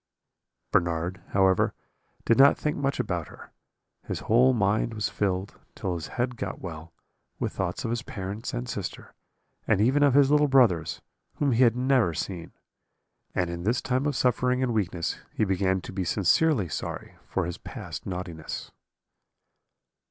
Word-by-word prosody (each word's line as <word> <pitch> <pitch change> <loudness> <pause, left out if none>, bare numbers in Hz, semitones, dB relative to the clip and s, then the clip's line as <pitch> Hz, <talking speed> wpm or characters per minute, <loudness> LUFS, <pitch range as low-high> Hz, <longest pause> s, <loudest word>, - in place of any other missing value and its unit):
"Bernard, 85 +1 0
however, 95 -2 +3 0.5
did 115 - +4
not 135 +3 +7
think 150 0 -1
much 140 -2 -1
about 90 -9 -2
her; - - -13 0.6
his - - -3
whole 125 +4 +4
mind 110 0 +1
was 105 - -1
filled, 95 -1 -2 0.2
till 95 - -2
his 85 -3 -4
head 125 0 -1
got 100 -3 -4
well, 80 -2 -8 0.5
with - - -2
thoughts - - -3
of 115 - -1
his 120 0 -1
parents 105 +2 -5
and 125 -1 -4
sister, 100 -6 -6 0.5
and - - +3
even 130 +7 +3
of 140 -2 +5
his 140 -1 +5
little 150 0 +5
brothers, 120 - +3 0.3
whom 145 -2 +1
he 120 +1 +2
had 120 -2 +5
never 125 -9 +2
seen. 85 -1 -5 0.8
And 90 -2 0
in 85 0 -5
this 115 +8 +1
time 130 +2 0
of 145 - -1
suffering 125 +1 +2
and 125 -2 0
weakness 90 -6 -1 0.2
he 110 - +2
began 95 -1 +1
to 95 - -9
be 95 -1 -1
sincerely 100 - +2
sorry - - -5
for 95 - -1
his 85 0 -5
past - - -7
naughtiness. 90 -4 -5
105 Hz, 160 wpm, -27 LUFS, 90-125 Hz, 0.8 s, not